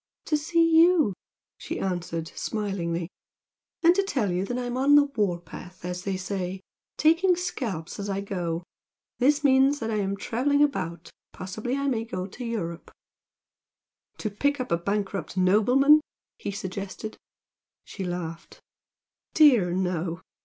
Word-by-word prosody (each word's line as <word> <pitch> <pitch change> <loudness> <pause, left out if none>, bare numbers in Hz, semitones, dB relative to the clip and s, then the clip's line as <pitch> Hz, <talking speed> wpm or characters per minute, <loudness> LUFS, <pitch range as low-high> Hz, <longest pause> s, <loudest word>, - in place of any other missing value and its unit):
"To 305 - +1
see 330 +3 +2
you!" 335 - +4 0.5
she - - -5
answered 175 -3 -3
smilingly 180 -5 -3 0.7
"And 340 +1 +7
to 395 - +2
tell 265 - -1
you 180 +1 0
that 245 +4 -3
I'm 245 -1 -3
'on 275 +3 +4
the 290 - +8
war 210 -11 -1
path' 175 +2 -11
as 180 0 -5
they 195 -1 -1
say, 185 0 -4 0.4
taking 340 +4 +4
scalps 225 - -4
as 200 0 -4
I 195 0 -1
go. 175 -4 -3 0.6
This 290 +3 +3
means 270 +1 +5
that 225 -4 -3
I'm 200 -2 -1
travelling 280 +8 +1
about, 170 - -2 0.2
possibly 220 +7 -4
I 280 - -2
may 235 -5 0
go 185 -5 -4
to 205 +6 -9
Europe 185 -8 -4 0.6
" - - -53
"To 215 - -3
pick 285 +7 0
up 255 - -4
a 170 - +3
bankrupt 195 -1 -3
nobleman!" 250 +11 +5 0.4
he - - -4
suggested. 195 +2 -5 0.7
She 195 - -6
laughed. 175 -2 -6 0.8
"Dear, 245 - +6
no! 180 -2 -2
205 Hz, 145 wpm, -26 LUFS, 180-275 Hz, 0.8 s, the